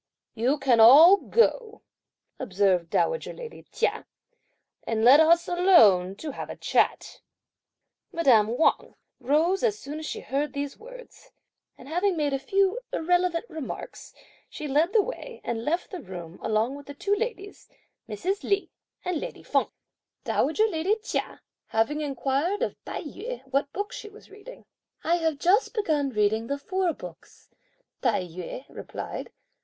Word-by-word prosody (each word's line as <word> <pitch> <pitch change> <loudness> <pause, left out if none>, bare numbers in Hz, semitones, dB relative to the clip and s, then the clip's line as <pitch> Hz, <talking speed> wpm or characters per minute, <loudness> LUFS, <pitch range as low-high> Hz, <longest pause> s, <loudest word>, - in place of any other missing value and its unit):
"You 250 +6 +1
can 260 -4 +2
all 300 - +9
go," 460 0 0 0.6
observed 190 -7 +1
dowager 485 - 0
lady 475 -2 -10
Chia, - - -1 0.8
"and 225 0 0
let 270 +5 +8
us 335 +2 +4
alone 220 - +5
to 300 +8 -6
have - - -7
a - - -6
chat." - - 0 0.9
Madame 245 - +3
Wang 320 - +1 0.2
rose 310 +9 +1
as 435 -4 +1
soon 300 -4 -7
as 315 - -6
she - - -5
heard 285 +3 -2
these 285 0 -4
words, - - -14 0.5
and 255 - -14
having 355 +4 0
made 290 -2 0
a 275 - 0
few 390 - +1
irrelevant 355 +2 +1
remarks, 315 - -8 0.4
she 300 - -6
led 300 +6 +2
the 440 -3 +4
way - - -8
and 230 -1 -3
left 335 +7 -2
the 365 -4 -6
room 175 -5 -9
along 220 +3 0
with 285 0 -11
the 285 - -9
two 400 +7 -1
ladies, 410 -3 -6 0.4
Mrs. 370 - -2
Li 400 0 -1 0.3
and 360 -3 -1
lady - - -7
Feng. - - 0 0.5
Dowager 375 +9 +1
lady 380 0 0
Chia, - - -4 0.3
having 255 +8 0
inquired 285 - -1
of - - -2
Tai - - -5
yü - - -7
what 275 +2 -1
books 410 +1 -5
she 425 - -9
was 420 0 -17
reading, 420 +5 -13 0.4
"I 340 +2 +2
have 320 -3 -1
just 395 - +2
begun 310 -10 0
reading 220 -1 0
the 280 - -2
Four 370 +5 -1
Books," - - -13 0.5
Tai 225 -7 +1
yü 180 +9 -8
replied. - - -7
310 Hz, 150 wpm, -26 LUFS, 255-390 Hz, 0.9 s, all